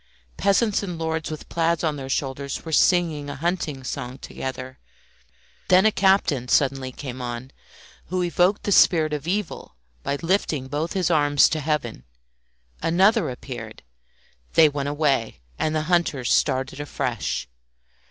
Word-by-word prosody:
Peasants 200 +1 +2
and 180 -4 -5
lords 160 -1 -2
with 155 -1 -7
plaids 170 0 0
on 155 -2 0
their 135 -2 -7
shoulders 135 +2 -3
were 160 - -5
singing 160 -3 +2
a 140 - -5
hunting 150 -3 -2
song 125 0 -5
together; 130 0 -7 0.9
then 185 +2 +5
a 220 - +5
captain 190 - +2
suddenly 135 -1 +1
came 130 -1 -7
on, 120 +2 -5 0.6
who 185 0 -1
evoked 180 +3 +2
the 205 - -1
spirit 160 -5 +5
of 150 +1 -4
evil 190 - -3 0.3
by 140 - -2
lifting 165 -7 0
both 150 +5 -3
his 180 -2 0
arms 145 -3 +5
to 155 - -2
heaven. 145 - -2 0.8
Another 195 - +3
appeared; 120 -3 -8 0.7
they 160 - +7
went 145 -1 -2
away, 140 - 0 0.2
and 155 0 0
the 155 - 0
hunters 155 -7 +1
started 135 +1 0
afresh. 145 - -3
150 Hz, 145 wpm, -24 LUFS, 135-175 Hz, 0.9 s, they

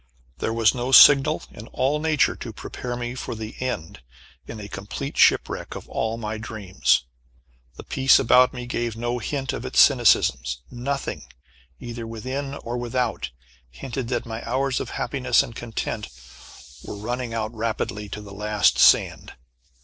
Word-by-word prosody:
There - - -1
was 115 -1 +3
no 125 0 -3
signal 145 +3 +7
in 110 - -11
all 140 +4 0
nature 155 -3 +2
to - - -7
prepare 125 -1 -6
me 120 0 -4
for 125 - -5
the 110 0 -7
end 100 - -4 0.5
in 110 - -7
a 100 - -7
complete 105 +9 -6
shipwreck - - +2
of - - -8
all 110 0 -2
my 110 -1 -4
dreams. 95 - 0 0.7
The - - -10
peace 135 0 +4
about 125 0 +5
me 125 -2 -7
gave 120 -2 -3
no 120 +1 -2
hint 135 +3 -3
of - - -5
its - - 0
cynicism. 65 - +5 0.3
Nothing, 135 +3 -4 0.5
either 120 -1 -7
within 130 +5 -5
or 120 -2 -5
without, 120 - -2 0.4
hinted 130 - -6
that 120 -1 -2
my 115 0 -6
hours 130 +2 -1
of - - -5
happiness 140 0 +1
and 115 -5 -10
content 115 - -4 0.7
were - - -7
running 120 +2 -4
out 110 0 -3
rapidly 110 -2 -3
to 105 - -6
the 100 -1 -11
last 105 +1 +1
sand! - - +4
120 Hz, 155 wpm, -24 LUFS, 110-130 Hz, 0.7 s, signal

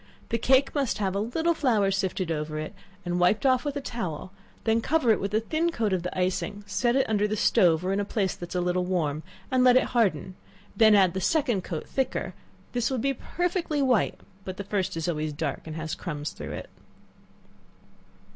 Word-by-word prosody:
The 230 - 0
cake 265 +4 +3
must 275 -6 0
have 195 -3 -1
a 200 - -1
little 320 +11 0
flour 225 -11 +2
sifted 190 -2 -1
over 155 -1 -3
it, 155 +6 -5 0.3
and 175 0 -1
wiped 180 +9 +3
off 255 -2 +4
with 290 -1 -3
a 285 - -2
towel, 185 - -5 0.3
then 225 0 +2
cover 290 -3 +2
it 215 - +3
with 200 - -2
a 215 - +2
thin 320 +8 0
coat 220 -9 0
of 185 - 0
the 180 +1 -5
icing, 190 +3 -1
set 210 +5 +1
it 270 - +2
under 210 -1 +1
the 215 - -1
stove 170 -3 +3
or 190 - +1
in 195 - 0
a - - +1
place 200 -2 -1
that 175 - -8
is - - -7
a 180 - +1
little 180 +1 0
warm, 160 -5 -1 0.3
and 255 -1 +3
let 250 0 +7
it - - +4
harden; 210 -5 +1 0.4
then 220 -2 +6
add 190 -3 +4
the 190 - -3
second 245 - +1
coat 160 -4 -5
thicker; 265 -1 -2 0.4
this 245 -1 0
will 265 - -1
he 275 +4 +1
perfectly 350 +1 -2
white, 250 -7 +2 0.2
but 185 -1 -6
the 200 - -4
first 195 -4 -2
is 165 - -2
always 155 -3 -2
dark 145 +1 -4
and 155 - -6
has 160 0 -4
crumbs 150 -4 -4
through - - -7
it. - - -7
200 Hz, 215 wpm, -27 LUFS, 180-250 Hz, 0.4 s, let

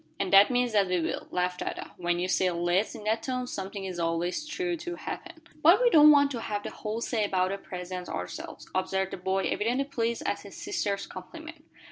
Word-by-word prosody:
"And 195 -1 -1
that 195 +1 +8
means 245 -2 +1
that 200 -2 +4
we 180 -1 +1
will," 160 - -3
laughed 180 0 -1
Ada. - - -5
"When 175 0 -1
you 180 +1 -1
say, 185 0 +2
'let's' 175 +4 0
in 215 - -9
that 220 +2 0
tone 255 -1 -2
something 195 -3 -5
is 185 -2 -5
always 175 - -1
sure 355 +2 -1
to 345 +1 -5
happen." 320 - -7 0.2
"But 340 +7 +7
we - - +4
don't 305 -3 +9
want 285 -1 +6
to 240 -4 -3
have 205 -2 -3
the - - -5
whole 220 +2 -4
say 230 -2 0
about 185 -2 +1
the 200 - -3
presents 180 -1 -6
ourselves," 90 0 -6
observed 190 0 0
the - - -5
boy, 190 +1 0
evidently 245 +6 0
pleased 235 -4 -2
at - - 0
his - - -11
sister's 205 - -2
compliment. 315 - -10
200 Hz, 215 wpm, -28 LUFS, 185-260 Hz, 0.2 s, don't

